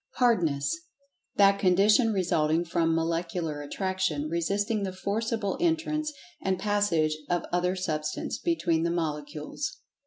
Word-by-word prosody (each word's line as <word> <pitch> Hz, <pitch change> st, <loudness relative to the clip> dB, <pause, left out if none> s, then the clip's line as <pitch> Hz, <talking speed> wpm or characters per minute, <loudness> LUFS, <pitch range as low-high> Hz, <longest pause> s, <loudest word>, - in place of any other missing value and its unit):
Hardness: 165 Hz, -, +2 dB, 0.6 s
That 200 Hz, 0 st, +5 dB
condition 205 Hz, +5 st, +4 dB
resulting 170 Hz, -4 st, +1 dB
from 165 Hz, -1 st, +1 dB
Molecular 165 Hz, -2 st, -1 dB
Attraction 175 Hz, -2 st, -2 dB
resisting 200 Hz, +6 st, 0 dB
the 195 Hz, -1 st, -2 dB
forcible 205 Hz, +2 st, -2 dB
entrance 315 Hz, -2 st, 0 dB, 0.3 s
and 190 Hz, -1 st, 0 dB
passage 185 Hz, -7 st, +1 dB
of 175 Hz, -1 st, +1 dB
other 180 Hz, +1 st, +1 dB
Substance 155 Hz, -5 st, -3 dB
between 180 Hz, -, +1 dB
the 170 Hz, -, +1 dB
molecules. 150 Hz, -, -3 dB
180 Hz, 115 wpm, -28 LUFS, 160-205 Hz, 0.6 s, That